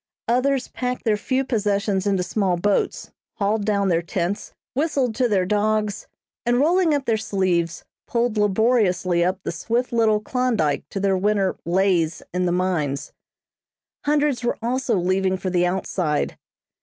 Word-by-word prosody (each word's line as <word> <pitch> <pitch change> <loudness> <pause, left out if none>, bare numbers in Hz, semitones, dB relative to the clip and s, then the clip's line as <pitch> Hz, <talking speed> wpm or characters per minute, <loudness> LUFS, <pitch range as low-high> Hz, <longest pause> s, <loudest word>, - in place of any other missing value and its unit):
Others 255 +2 +1
packed 250 0 -3
their 220 -2 +3
few 260 +6 -1
possessions 205 -4 0
into 195 -2 +1
small 185 -2 0
boats, 200 +3 0 0.2
hauled 205 0 0
down 200 -2 +1
their 170 -1 +2
tents, 175 +3 -3 0.2
whistled 275 -4 0
to 250 +2 +1
their 190 -3 +2
dogs, 210 +1 0 0.4
and 240 0 +2
rolling 330 +2 +3
up 280 -2 -2
their 225 -3 +2
sleeves, 185 -6 -1 0.2
pulled 235 -2 0
laboriously 205 -4 +2
up 185 +2 +1
the - - -2
swift 230 +10 -2
little 220 -2 +3
Klondyke 215 - 0
to 195 - -4
their 195 -1 +2
winter 195 0 +1
"lays" 175 -2 +1
in 180 0 0
the - - +1
mines. 170 -6 -1 0.9
Hundreds 290 -3 +1
were 240 - 0
also 245 0 0
leaving 185 +1 +1
for 185 0 -3
the 175 0 +2
outside. 175 -4 -1
205 Hz, 150 wpm, -23 LUFS, 185-240 Hz, 0.9 s, their